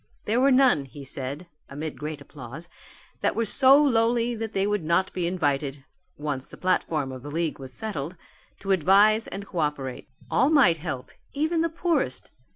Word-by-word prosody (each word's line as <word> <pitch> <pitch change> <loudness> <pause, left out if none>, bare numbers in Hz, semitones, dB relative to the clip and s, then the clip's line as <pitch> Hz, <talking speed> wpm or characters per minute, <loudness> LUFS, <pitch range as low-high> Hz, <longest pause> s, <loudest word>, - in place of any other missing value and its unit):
There 230 +4 +1
were 275 - +5
none 255 - +4
he 140 +2 -11
said, 135 +5 -5 0.2
amid 150 +2 -6
great 150 -1 -5
applause, 140 +3 -10 0.5
that - - 0
were 230 - +1
so 265 +4 +6
lowly 235 -3 +2
that 225 -1 -4
they 195 0 +1
would 205 -3 0
not 170 +4 +1
be 175 -2 -1
invited 145 -5 -1 0.3
once 145 -3 -4
the - - -13
platform 155 -6 0
of 130 -1 -8
the 145 - -8
league 160 0 -2
was 130 -1 -9
settled 180 - -5 0.4
to 195 - -2
advise 200 +5 +4
and 200 +1 -6
co 180 -3 -5
operate. 145 -4 -3 0.2
All 265 - +4
might 270 - +5
help, 150 -6 -5 0.2
even 315 +3 +1
the 335 - +1
poorest. 320 - -1
175 Hz, 175 wpm, -26 LUFS, 145-225 Hz, 0.5 s, so